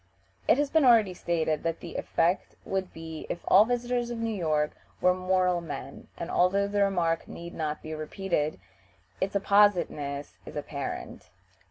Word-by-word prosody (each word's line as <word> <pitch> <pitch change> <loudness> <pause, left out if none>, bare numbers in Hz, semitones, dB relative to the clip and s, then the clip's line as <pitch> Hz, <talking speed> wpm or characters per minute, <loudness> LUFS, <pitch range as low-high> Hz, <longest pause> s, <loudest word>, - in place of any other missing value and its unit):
It - - +5
has 290 -1 0
been 320 -2 +4
already 225 -7 +6
stated 160 -3 -1
what 165 0 -1
the 170 - -8
effect 170 +3 0
would 190 -1 -2
be 160 -1 -8
if 170 - -3
all 200 +3 +7
visitors 245 0 -1
to 240 - -3
New 230 -1 -2
York 155 -5 +1 0.3
were 180 - +4
moral 185 -1 +1
men, 140 -4 -7
and, 170 - -5
although 195 +3 +3
the 205 0 0
remark 175 -4 +1
need 170 0 -8
not 155 -2 -3
be 155 - -5
repeated, 155 0 -2 0.6
its 195 +1 -1
appositeness 180 -9 +2
is - - -10
apparent. - - -5
180 Hz, 160 wpm, -28 LUFS, 160-200 Hz, 0.6 s, all